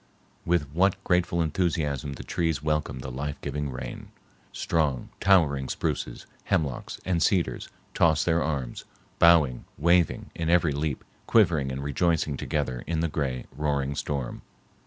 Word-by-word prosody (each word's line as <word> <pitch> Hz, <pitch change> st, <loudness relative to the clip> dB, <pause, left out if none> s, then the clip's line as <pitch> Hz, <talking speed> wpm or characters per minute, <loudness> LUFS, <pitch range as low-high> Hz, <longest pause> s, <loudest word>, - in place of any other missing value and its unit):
With 85 Hz, -2 st, +2 dB
what 95 Hz, +3 st, +2 dB
grateful 85 Hz, -1 st, +2 dB
enthusiasm 75 Hz, -4 st, -1 dB
the -, -, -8 dB
trees 80 Hz, -5 st, -1 dB
welcomed 75 Hz, -4 st, -1 dB
the 65 Hz, -1 st, -6 dB
life 70 Hz, +3 st, -4 dB
giving 75 Hz, 0 st, -3 dB
rain! 65 Hz, -1 st, -7 dB, 0.4 s
Strong, 75 Hz, -7 st, 0 dB
towering 75 Hz, -9 st, +3 dB
spruces, -, -, -3 dB, 0.2 s
hemlocks, 70 Hz, -6 st, -1 dB
and 90 Hz, -3 st, +1 dB
cedars 85 Hz, -11 st, +1 dB, 0.2 s
tossed 80 Hz, -2 st, +3 dB
their 85 Hz, 0 st, +2 dB
arms, 70 Hz, -6 st, -3 dB, 0.4 s
bowing, 80 Hz, -7 st, +5 dB
waving, 85 Hz, +2 st, +2 dB
in 80 Hz, -1 st, -2 dB
every 85 Hz, -3 st, +4 dB
leap, 75 Hz, 0 st, -2 dB, 0.2 s
quivering 80 Hz, -, +3 dB
and 65 Hz, +1 st, -4 dB
rejoicing 75 Hz, +1 st, +1 dB
together 65 Hz, -2 st, -2 dB
in 80 Hz, -1 st, 0 dB
the 85 Hz, -, 0 dB
gray, 65 Hz, -4 st, -2 dB
roaring 70 Hz, -1 st, 0 dB
storm. 70 Hz, -3 st, -3 dB
75 Hz, 135 wpm, -27 LUFS, 70-85 Hz, 0.4 s, bowing